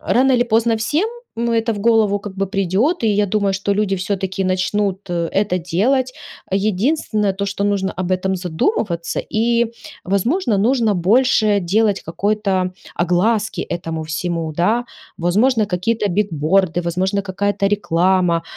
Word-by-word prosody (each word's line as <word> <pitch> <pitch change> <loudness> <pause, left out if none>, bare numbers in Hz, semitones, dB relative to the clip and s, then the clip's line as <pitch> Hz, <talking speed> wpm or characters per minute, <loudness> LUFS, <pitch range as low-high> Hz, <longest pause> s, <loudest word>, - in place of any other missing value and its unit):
рано 260 +2 +2
или 245 -1 +4
поздно 230 0 +2
всем, 300 - 0 0.3
но 235 0 0
это 225 0 +1
в - - -6
голову, 220 -2 +3
как 200 -1 -8
бы, 195 0 -1
придет, 195 - 0
и - - +3
я 210 0 +2
думаю, 200 0 0
что 200 +1 -1
люди 205 -1 0
всё-таки 190 0 -2
начнут, 185 +1 0
э, 170 -1 -1
это 195 -2 0
делать. 250 - 0 0.4
Единственное, 210 - 0
то 200 +1 -3
что 200 0 -3
нужно 200 -1 0
об 185 0 -3
этом 190 +1 0
задумываться 175 - -1 0.2
и, 235 +2 +2 0.4
возможно, 215 - 0
нужно 225 0 +2
больше 210 +2 +3
делать 205 +3 +1
какой-то 190 0 -1 0.2
огласки 205 +6 +1
этому 165 -2 -4
всему, 165 +1 -3
да. 220 +8 +1 0.3
Возможно, 215 +6 +2
какие-то 205 +3 -1
бигборды, 175 -2 +1
возможно, 185 +4 -1
какая-то 200 +1 -1
реклама, 180 -3 +1
200 Hz, 140 wpm, -19 LUFS, 185-220 Hz, 0.4 s, или